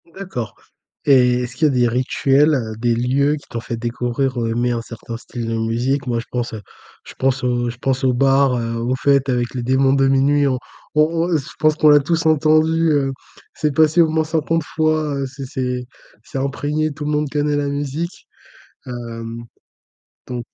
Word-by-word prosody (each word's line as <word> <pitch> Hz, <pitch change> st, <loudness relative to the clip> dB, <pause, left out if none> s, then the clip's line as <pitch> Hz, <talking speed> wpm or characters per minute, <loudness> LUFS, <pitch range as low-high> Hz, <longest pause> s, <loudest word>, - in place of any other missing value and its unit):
D'accord. 125 Hz, -, -5 dB, 0.5 s
Et 125 Hz, -3 st, +4 dB
est-ce 125 Hz, 0 st, -7 dB
qu'il 155 Hz, +2 st, +3 dB
y -, -, +2 dB
a -, -, -3 dB
des 120 Hz, -1 st, +3 dB
rituels, 135 Hz, +4 st, +2 dB
heu, 110 Hz, -4 st, -3 dB
des 120 Hz, +1 st, +1 dB
lieux 135 Hz, +5 st, +1 dB
qui 145 Hz, -, -12 dB
t'ont 115 Hz, -, -4 dB
fait 115 Hz, -, -5 dB
découvrir 120 Hz, +2 st, -2 dB
ou 115 Hz, -1 st, 0 dB
aimer 120 Hz, +2 st, 0 dB
un 115 Hz, -1 st, -1 dB
certain 115 Hz, 0 st, -8 dB
style 120 Hz, -1 st, -6 dB
de 115 Hz, -, -1 dB
musique? 120 Hz, +5 st, -1 dB
Moi, 120 Hz, -1 st, 0 dB
je 115 Hz, -, -7 dB
pense 120 Hz, -2 st, -3 dB
heu, 110 Hz, -, -6 dB, 0.4 s
je -, -, -11 dB
pense 135 Hz, 0 st, 0 dB
au 120 Hz, -1 st, 0 dB
je 120 Hz, -, -7 dB
pense 130 Hz, +1 st, -1 dB
aux 130 Hz, -, +3 dB
bars, 135 Hz, 0 st, +3 dB
heu, 115 Hz, -1 st, -3 dB
aux 120 Hz, +3 st, -1 dB
fêtes 140 Hz, 0 st, +2 dB
avec 120 Hz, -1 st, 0 dB
Les 125 Hz, -, -2 dB
Démons 130 Hz, +2 st, +3 dB
de 135 Hz, -1 st, +3 dB
Minuit 140 Hz, +2 st, +3 dB
en 130 Hz, -, +1 dB, 0.4 s
on 150 Hz, -, +5 dB
on 165 Hz, +2 st, 0 dB
on 160 Hz, -, +4 dB
je 140 Hz, -, -6 dB
pense 155 Hz, -1 st, +3 dB
qu'on 155 Hz, -1 st, +4 dB
l'a 145 Hz, 0 st, +7 dB
tous 160 Hz, +3 st, -1 dB
entendu, 155 Hz, +1 st, +3 dB
heu, 135 Hz, -2 st, +1 dB, 0.4 s
c'est 150 Hz, -2 st, -1 dB
passé 160 Hz, +2 st, +5 dB
au 160 Hz, -, +4 dB
moins 160 Hz, 0 st, +1 dB
50 160 Hz, +1 st, 0 dB
fois, 155 Hz, -2 st, +1 dB
heu, 140 Hz, 0 st, -2 dB
c'est 135 Hz, +1 st, -8 dB
c'est 125 Hz, -2 st, -3 dB, 0.4 s
c'est -, -, -7 dB
imprégné, 145 Hz, +3 st, -1 dB
tout 150 Hz, 0 st, -6 dB
le 150 Hz, -, -1 dB
monde 150 Hz, -1 st, 0 dB
connaît 145 Hz, 0 st, 0 dB
la 145 Hz, -1 st, -1 dB
musique. 145 Hz, +5 st, -4 dB, 0.6 s
Hem, 115 Hz, -1 st, -6 dB, 0.8 s
donc. 120 Hz, -1 st, -5 dB
135 Hz, 205 wpm, -20 LUFS, 120-150 Hz, 0.8 s, l'a